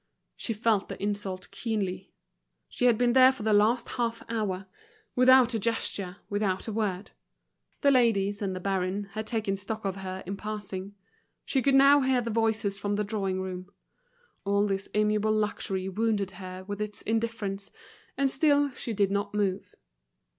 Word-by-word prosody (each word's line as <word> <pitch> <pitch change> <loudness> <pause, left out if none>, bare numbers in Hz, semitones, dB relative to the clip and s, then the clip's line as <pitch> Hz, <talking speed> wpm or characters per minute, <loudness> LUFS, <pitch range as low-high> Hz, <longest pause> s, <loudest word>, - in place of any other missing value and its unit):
She - - -4
felt 215 -2 +1
the - - -6
insult 200 -2 -3
keenly. 195 -3 -3 0.6
She 250 - -2
had 240 -3 +5
been 240 0 +2
there 260 0 +8
for 260 -5 -8
the 215 0 +2
last 220 +4 +3
half 235 -2 -2
hour, 195 -4 -2 0.5
without 255 -1 +6
a 225 - 0
gesture, 200 -4 -2
without 205 -1 -1
a 220 - -3
word. 205 -3 -2 0.7
The 280 - +5
ladies 205 -6 +2
and 190 -2 -2
the - - -4
baron 195 +1 -2
had 215 +1 -5
taken 215 -4 -1
stock 215 +2 -4
of 195 -1 -2
her 190 -1 -6
in 195 +2 -4
passing; 205 -2 -6 0.5
she 265 - +1
could 275 +1 +3
now 280 +1 +7
hear 260 -1 +2
the 230 -1 -3
voices 220 -3 0
from 205 0 -1
the 210 - 0
drawing 195 -3 -2
room. 185 0 -6 0.7
All 200 +1 +2
this 195 -1 -2
amiable 210 0 +2
luxury 200 -3 -1
wounded 200 0 0
her 185 0 -8
with 205 +2 -5
its 210 -1 -4
indifference, 220 -3 -2 0.5
and 275 -1 +2
still 285 0 +3
she 235 -2 -5
did 200 -2 +1
not 200 +1 -2
move. 195 -3 -1
210 Hz, 170 wpm, -28 LUFS, 195-230 Hz, 0.7 s, there